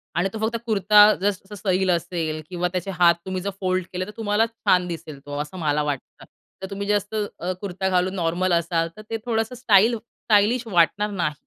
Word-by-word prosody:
आणि 175 +3 +1
तो 220 - -5
फक्त 225 +2 -1
कुर्ता 210 -1 +6 0.2
जस 200 -2 0
जस 205 - -9
सैल 190 -1 +1
असेल 165 -2 -2
किंवा 180 -1 -1
त्याचे 185 +2 -2
हात 170 -1 +6
तुम्ही 185 -1 -3
जर 200 - -1
फोल्ड 185 -1 0
केले 185 +1 -2
तर 210 - -9
तुम्हाला 220 0 +2
छान 185 -5 +1
दिसेल 155 -4 -7
तो 145 0 -5
असं 150 +5 -8
मला 150 -1 +1
वाटतं. 145 -3 -5 0.4
तर 190 - -4
तुम्ही 200 0 -5
जे 210 - +2
असं 205 +1 -1
अ, 180 +2 -2
कुर्ता 190 -1 -2
घालून 185 +1 +1
नॉर्मल 175 +1 0
असाल 170 0 +1
तर - - -8
ते 225 - -2
थोडंसं 225 0 -1
स्टाइल 230 -1 +4
स्टाइलिश 225 +2 +1
वाटणार 205 +2 +2
नाही 170 -6 -1
190 Hz, 205 wpm, -23 LUFS, 175-210 Hz, 0.4 s, कुर्ता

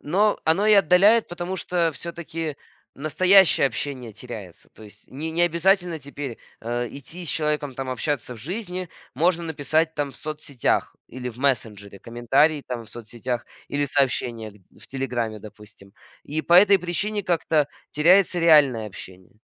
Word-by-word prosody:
Но 200 +7 +1
оно 165 +6 +2
и 215 - +6
отдаляет, 200 +5 +5
потому 175 +2 -5
что 170 -2 0
всё-таки 165 0 -6 0.4
настоящее 180 +3 +4
общение 130 -2 -5
теряется. 105 -5 -10
То - - -17
есть 105 0 -15
ни 145 +5 -6
не 165 +2 0
обязательно 175 0 +2
теперь, 140 -4 -7 0.2
э, 120 +1 -2
идти 165 +6 -9
с - - -6
человеком, 150 -3 -1
там, 135 0 -5
общаться 130 -1 -3
в 115 - -12
жизни. 180 - -5 0.3
Можно 170 +4 +1
написать 160 +1 0
там 145 -2 -2
в - - -13
соцсетях 150 -4 -2
или 125 0 -6
в 120 - -10
мессенджере 110 -7 -2
комментарии 135 +6 +1
там 120 -2 -5
в - - -17
соцсетях 120 +1 -5 0.2
или 145 0 -1
сообщения 125 -5 -1
гд 95 -3 -23
в - - -14
телеграме, 120 -5 -3
допустим. 105 -1 -14 0.3
И 155 +2 -3
по 170 - +2
этой 195 +2 +7
причине 200 +4 -2
как-то 160 -4 +1 0.2
теряется 180 +3 +4
реальное 145 -9 +5
общение. 95 +1 -13
145 Hz, 155 wpm, -23 LUFS, 120-170 Hz, 0.4 s, этой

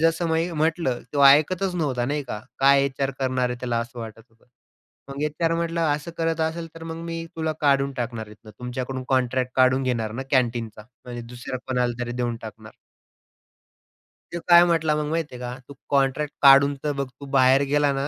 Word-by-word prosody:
जसं 165 +1 +2
मी 165 +2 0
म्हटलं 160 -5 0
तो 140 -1 +2
ऐकतच 175 +7 +4
नव्हता, 135 -8 -1
नाही 145 +3 -1
का? 105 -4 -6 0.2
काय 140 0 +5
एचआर 135 0 -1
करणार 130 -1 0
आहे 125 - -4
त्याला 120 -2 -1
असं 120 +1 -8
वाटत 115 -1 -8
होतं. 115 0 -30 0.6
मग 140 +2 -5
एचआर 165 +2 0
म्हटला, 165 0 -1
"असं 150 +3 -4
करत 165 0 0
असेल 160 +1 -2
तर 165 - -11
मग 165 0 -6
मी 165 0 -4
तुला 160 -1 -1
काढून 140 -1 +2
टाकणार 115 -3 -4
इथून. 105 +1 -14
तुमच्याकडून 130 +1 -5
कॉन्ट्रॅक्ट 130 -1 0
काढून 130 +1 +4
घेणार 115 -4 -1
ना 130 +4 -4
कँटीनचा," 115 -4 0 0.2
म्हणजे 120 -1 -7
दुसऱ्या 125 +1 -6
कोणाला 125 -2 0
तरी 120 0 -4
देऊन 120 -1 -2
टाकणार. 110 0 -10 1.6
तो 170 - -3
काय 175 0 +8
म्हटला 160 -3 +1
मग 150 0 -1
माहिती 160 -4 -2
आहे - - -9
का? 125 +1 -5
"तू 140 - -10 0.2
कॉंट्रॅक्ट 140 +1 +1
काढून 140 0 +7
तर 150 - 0
बघ, 140 -1 -3
तू 140 - -8
बाहेर 130 +1 +5
गेला 145 -1 +3
ना, 135 +1 -2
135 Hz, 190 wpm, -24 LUFS, 125-155 Hz, 1.6 s, काय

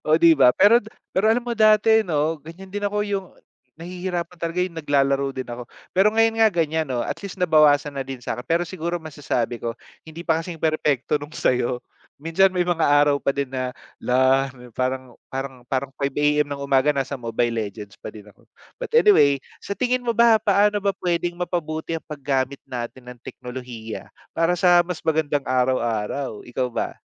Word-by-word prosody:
Oh, 155 - +5
'di 170 0 +6
ba, 125 -2 +7
pero 230 +4 +6
d 210 - -20 0.3
pero 205 +4 +2
alam 235 +2 +2
mo 240 - -2
dati 215 0 +5
'no, 160 -5 -1
ganiyan 175 +5 -12
din 205 0 -3
ako 210 +1 -2
yung 200 -2 -3 0.5
nahihirapan 180 0 -5
talaga, 170 +1 -3
yung 185 - -6
naglalaro 140 -2 +1
din 130 - -3
ako. 120 0 -8 0.2
Pero 190 +3 +4
ngayon 225 0 +2
nga 220 - +7
ganiyan 160 -4 -1
'no, 125 -2 -1
at - - -4
least 200 -1 -7
nabawasan 150 -5 +3
na - - 0
din 135 -2 -7
sa'kin 125 - -4
pero 170 +1 +2
siguro 170 0 -4
masasabi 145 -7 -3
ko, 115 -1 -4 0.3
hindi 165 +2 -9
pa 165 -1 +1
kasing 170 0 -7
perpekto 150 -2 0
nung 145 +1 -9
sa'yo. 125 0 0 0.3
Minsan 165 +6 +3
may 180 -1 0
mga 175 -1 -1
araw 145 -1 +4
pa - - -4
din 140 -2 -2
na, 130 -1 -3 0.2
“Lah.” 130 +2 +3 0.2
Parang 130 +1 -3 0.2
parang 135 -1 -5
parang 135 0 -2
5 140 -1 -2
AM 150 0 +2
ng 145 - -4
umaga 135 0 +2
nasa 135 0 -2
Mobile 120 0 -1
Legends 105 -2 -5
pa - - -7
din 105 -2 -11
ako. 105 - -21 0.3
But - - -1
anyway, 405 - +6 0.2
sa 200 - -5
tingin 255 +2 +1
mo 235 -2 -2
ba, 230 -2 +5
paano 205 0 +3
ba 200 -1 -1
pwedeng 175 0 0
mapabuti 165 -3 -3
ang 165 - -4
paggamit 140 -2 -2
natin 125 0 -7
ng 120 - -20
teknolohiya 125 -3 -8 0.2
para 165 +2 +1
sa 175 -1 +5
mas 175 -2 -4
magandang 150 -3 0
araw-araw? 125 -2 -1
Ikaw 125 0 -2
ba? - - -3
150 Hz, 185 wpm, -23 LUFS, 130-180 Hz, 0.5 s, ba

